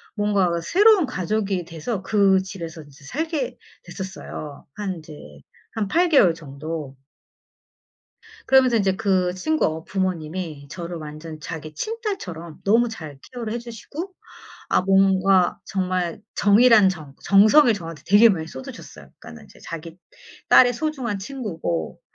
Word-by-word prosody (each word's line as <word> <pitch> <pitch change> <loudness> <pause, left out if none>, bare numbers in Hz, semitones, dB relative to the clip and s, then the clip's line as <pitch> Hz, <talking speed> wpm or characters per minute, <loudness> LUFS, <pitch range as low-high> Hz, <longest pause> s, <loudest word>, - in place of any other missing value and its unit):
뭔가 205 -4 +2
새로운 395 - +5
가족이 195 -4 -2
돼서 175 +6 -4
그 195 -2 +3
집에서 170 -4 -8
이제 145 -1 -18
살게 320 - -3 0.3
됐었어요, 185 -6 -8
한 200 -3 -4
이제 155 -1 -12 0.6
한 215 -3 -1
8 345 - +2
개월 195 - +5
정도. 150 -2 -7 1.5
그러면서 260 -3 +5
인제 195 -2 +1
그 185 -2 +1
친구 315 +12 0
어 160 +1 -3
부모님이 170 -5 -3
저를 175 -1 -6
완전 155 +1 -9
자기 155 +1 -7
친딸처럼 200 - -5
너무 230 +4 +3
잘 155 -10 -9
케어를 235 -3 -5
해 240 - -2
주시고 260 - -8 0.6
아 - - +3
뭔가 190 -1 +3
정말 185 -1 -2
정 205 +3 +4
이란 225 -6 +7
정, 155 -6 -7
정성을 215 +7 +6
저한테 165 -7 -8
되게 205 +4 +7
많이 160 -6 -1
쏟으셨어요. 130 -4 -10
그러니까는 80 - -12
이제 - - -19
자기 165 +1 -8 0.5
딸의 245 -1 +7
소중한 255 -7 -3
친구고 185 - -4
190 Hz, 285 characters per minute, -23 LUFS, 165-230 Hz, 1.5 s, 이란